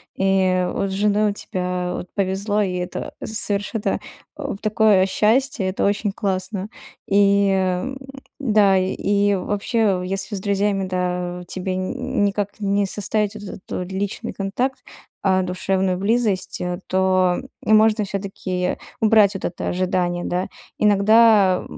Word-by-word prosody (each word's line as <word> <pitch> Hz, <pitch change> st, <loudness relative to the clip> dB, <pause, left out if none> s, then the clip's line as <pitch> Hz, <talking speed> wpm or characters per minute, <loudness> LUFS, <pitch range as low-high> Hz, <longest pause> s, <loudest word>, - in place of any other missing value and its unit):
и 190 Hz, -1 st, +2 dB
вот 195 Hz, -, -1 dB
с -, -, -4 dB
женой 210 Hz, +1 st, +2 dB
у -, -, -5 dB
тебя 180 Hz, -2 st, -3 dB
вот -, -, -6 dB
повезло, 200 Hz, +2 st, 0 dB
и 185 Hz, -3 st, -1 dB
это 180 Hz, 0 st, -4 dB
совершенно, 210 Hz, 0 st, -1 dB, 0.4 s
о -, -, -4 dB
в -, -, -9 dB
такое 215 Hz, -2 st, +3 dB
счастье, 225 Hz, +3 st, +1 dB
это 185 Hz, -, -1 dB
очень 205 Hz, 0 st, +1 dB
классно. 195 Hz, 0 st, -3 dB, 0.4 s
И, 200 Hz, 0 st, +4 dB
ам, 190 Hz, +8 st, -1 dB, 0.4 s
да, 210 Hz, -7 st, +4 dB
и 200 Hz, +2 st, +1 dB
вообще, 205 Hz, 0 st, 0 dB
если 195 Hz, +2 st, -3 dB
с -, -, -4 dB
друзьями, 200 Hz, -1 st, 0 dB
да, 180 Hz, -1 st, -2 dB
тебе 185 Hz, 0 st, -3 dB
ни 185 Hz, 0 st, -2 dB, 0.3 s
никак 205 Hz, +1 st, -3 dB
не 200 Hz, -1 st, +1 dB
составить 210 Hz, +1 st, -1 dB
вот 210 Hz, -, -8 dB
этот 195 Hz, -1 st, -8 dB
вот 180 Hz, +1 st, -4 dB
личный 195 Hz, +1 st, -3 dB
контакт, 245 Hz, +7 st, -2 dB, 0.4 s
а 190 Hz, -1 st, +3 dB
душевную 185 Hz, 0 st, -1 dB
близость, 200 Hz, -3 st, 0 dB, 0.3 s
то 185 Hz, -1 st, +2 dB, 0.3 s
и -, -, 0 dB
можно 215 Hz, 0 st, +5 dB
всё-таки 190 Hz, -2 st, -3 dB, 0.2 s
убрать 215 Hz, -2 st, +4 dB
вот -, -, -4 dB
это 175 Hz, -, -3 dB
ожидание, 180 Hz, -1 st, -1 dB
да. 180 Hz, +2 st, -1 dB, 0.3 s
Иногда, 210 Hz, -2 st, +5 dB
195 Hz, 140 wpm, -21 LUFS, 185-210 Hz, 0.4 s, можно